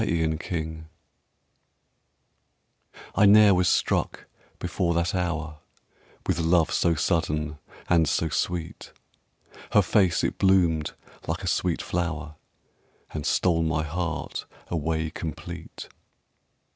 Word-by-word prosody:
First 80 -6 -1
Love 80 -2 -4 2.3
I 100 +2 +5
ne'er 105 0 +7
was 90 -1 +3
struck - - 0 0.3
before 85 -2 -1
that 85 +1 0
hour 80 -4 -2 0.7
With - - 0
love 85 0 +3
so 85 -1 +2
sudden 75 -2 -1 0.3
and 80 -4 +3
so 80 - +1
sweet. 85 +3 -3 0.8
Her - - +6
face 95 -5 +2
it - - -1
bloomed 85 -5 +3 0.3
like - - -2
a - - -3
sweet - - 0
flower 80 -3 -3 0.8
And 75 -2 -3
stole 85 -3 +2
my 80 -1 0
heart 85 +1 -4 0.2
away 80 -1 -1
complete. 85 0 -7
80 Hz, 105 wpm, -26 LUFS, 80-90 Hz, 2.3 s, ne'er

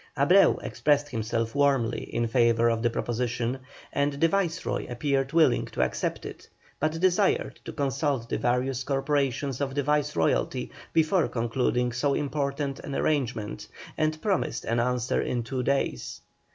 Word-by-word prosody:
Abreu - - +5
expressed 145 -1 +1
himself 115 -1 -2
warmly 135 -5 +2
in 120 - 0
favour 115 -1 +3
of 115 -1 -1
the 120 - +2
proposition, 120 +1 -2 0.3
and 140 0 +1
the 145 +4 +3
Viceroy 170 -2 -1
appeared 135 +2 0
willing 155 -7 +4
to - - -1
accept 65 - -2
it, - - -9 0.3
but 155 +1 +1
desired 185 +2 +2
to - - -5
consult 140 -3 -1
the - - -2
various 125 +1 0
corporations 135 -1 -1
of 135 -1 -2
the 145 - +1
Viceroyalty 145 - 0 0.2
before 165 +2 +3
concluding 125 +1 0
so 140 +4 0
important 140 -1 -2
an 140 - -6
arrangement, 120 - -1 0.3
and 155 0 0
promised 200 -4 -1
an 115 +1 0
answer 125 0 0
in 120 -1 -2
two 125 +2 -3
days. 140 +2 -1
135 Hz, 145 wpm, -27 LUFS, 120-145 Hz, 0.3 s, Abreu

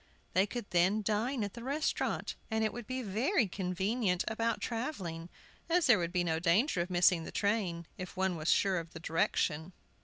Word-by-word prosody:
They 190 +2 +3
could 240 0 -5
then 185 +5 +3
dine 220 +4 0
at 205 - -4
the 235 - -8
restaurant, 285 +4 -1 0.2
and 220 -1 0
it 215 - 0
would 240 -2 -7
be 255 0 -3
very 235 - +1
convenient 190 +2 0
about 230 +1 0
travelling, 190 - -4 0.4
as 345 0 +3
there 240 -6 +6
would 170 -1 -2
be 180 -1 +1
no 160 -2 0
danger 175 - +2
of 175 - -3
missing 175 -1 +4
the - - -7
train, 195 -5 0
if 185 +1 -7
one 190 -1 +1
were 155 -1 -5
sure 190 0 +3
of 165 0 -9
the 160 - -7
direction. 160 +1 0
195 Hz, 190 wpm, -32 LUFS, 175-230 Hz, 0.4 s, there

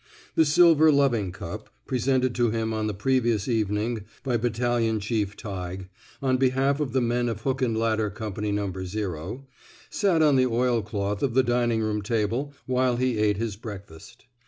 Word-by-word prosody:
The 160 - +4
silver 160 0 +6
loving 125 -9 +2
cup, - - -8 0.2
presented 130 0 +1
to 120 -1 +2
him 110 0 -1
on 110 -1 -1
the 105 - -2
previous 115 -1 +1
evening 110 -1 -1 0.2
by 130 -3 0
Battalion 115 -1 0
Chief 105 -1 -2
Tighe, 95 -2 -6 0.3
on 130 -1 +2
behalf 135 +2 +2
of 140 -5 -2
the 130 - +2
men 120 0 0
of 110 -2 -4
Hook 135 +2 -1
and 115 -3 +1
Ladder 110 -1 +1
Company 105 0 -4
No. 100 -2 -1
0, 95 - -5 0.5
sat 180 -6 +2
on 145 -3 +4
the 130 0 +4
oilcloth 110 -4 -1
of 130 -4 0
the 130 - +5
dining 120 -2 +1
room 105 -1 -1
table 115 +6 -1
while 130 -1 +1
he 125 -3 0
ate 105 -2 +2
his 110 -2 -3
breakfast. 100 +1 -11
115 Hz, 170 wpm, -26 LUFS, 105-130 Hz, 0.5 s, silver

